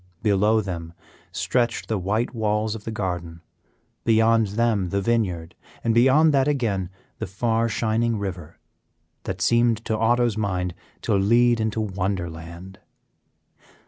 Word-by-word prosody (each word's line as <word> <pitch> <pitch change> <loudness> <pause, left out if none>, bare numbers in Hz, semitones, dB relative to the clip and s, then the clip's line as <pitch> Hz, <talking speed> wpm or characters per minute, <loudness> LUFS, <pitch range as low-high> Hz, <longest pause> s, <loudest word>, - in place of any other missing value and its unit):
Below 105 +1 +3
them 85 -4 -6 0.4
stretched 95 +7 -1
the 110 -3 -1
white 110 +8 -1
walls 105 -1 0
of 110 -2 -8
the 115 - -3
garden, 90 -5 -4 0.6
beyond 115 -1 +3
them 105 -3 0
the 100 - 0
vineyard, 95 -7 -1 0.3
and 115 - +2
beyond 135 +6 +5
that 135 0 +3
again 110 -11 0 0.3
the - - -3
far 115 +4 0
shining 115 0 0
river, 90 -6 -6 0.7
that - - -4
seemed 120 -1 +2
to 110 - 0
Otto's 120 0 +2
mind 90 -4 -1 0.3
to - - 0
lead 120 +4 +3
into 110 0 -1
wonder 95 -3 -2
land. 85 +4 -10
110 Hz, 135 wpm, -24 LUFS, 95-115 Hz, 0.7 s, beyond